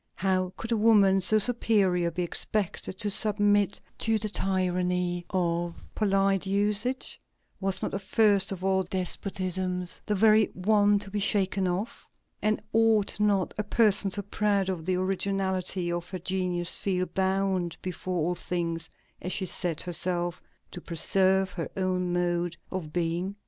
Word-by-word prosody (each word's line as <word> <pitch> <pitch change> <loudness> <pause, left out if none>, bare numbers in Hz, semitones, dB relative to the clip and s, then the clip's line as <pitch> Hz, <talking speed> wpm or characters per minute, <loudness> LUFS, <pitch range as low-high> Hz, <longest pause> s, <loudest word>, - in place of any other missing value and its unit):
How 185 -1 0
could 225 - -6
a 230 - +2
woman 205 -3 +4
so 215 +4 +4
superior 200 -6 +2
be 180 +2 -3
expected 190 +1 -2
to 205 +1 -2
submit 205 -1 +3 0.2
to 225 -1 +2
the 215 0 -1
tyranny 180 -2 -1
of 170 -2 -1 0.2
polite 195 -2 +1
usages? 210 +6 0 0.4
Was 190 -1 0
not - - -2
the 195 - -3
first 200 -1 +2
of 185 -1 -6
all 190 0 +2
despotisms 185 0 -3
the 210 - +1
very 215 +1 +5
one 205 +2 +3
to 200 -1 -6
be 210 - -2
shaken 195 -1 +1
off? 185 +5 -4 0.3
and 215 0 0
ought 220 -2 +2
not 200 -3 +1
a - - +1
person 210 -2 +3
so 200 +1 -1
proud 200 -1 0
of 170 -3 -4
the 185 - +1
originality 185 -1 -1
of 175 0 -4
her 185 - -4
genius 180 -1 -1
feel 185 -2 -1
bound 190 -2 -1
before 185 0 -4
all 175 - 0
things, 170 -2 -4 0.3
as 180 - -4
she 190 - -1
said 175 -3 -1
herself, 175 0 -2 0.3
"to 180 - -8
preserve 190 +3 +2
her 170 - -5
own 185 -1 -1
mode 175 -1 -1
of 175 -5 -5
being"? 175 +3 -2
190 Hz, 150 wpm, -27 LUFS, 180-205 Hz, 0.4 s, very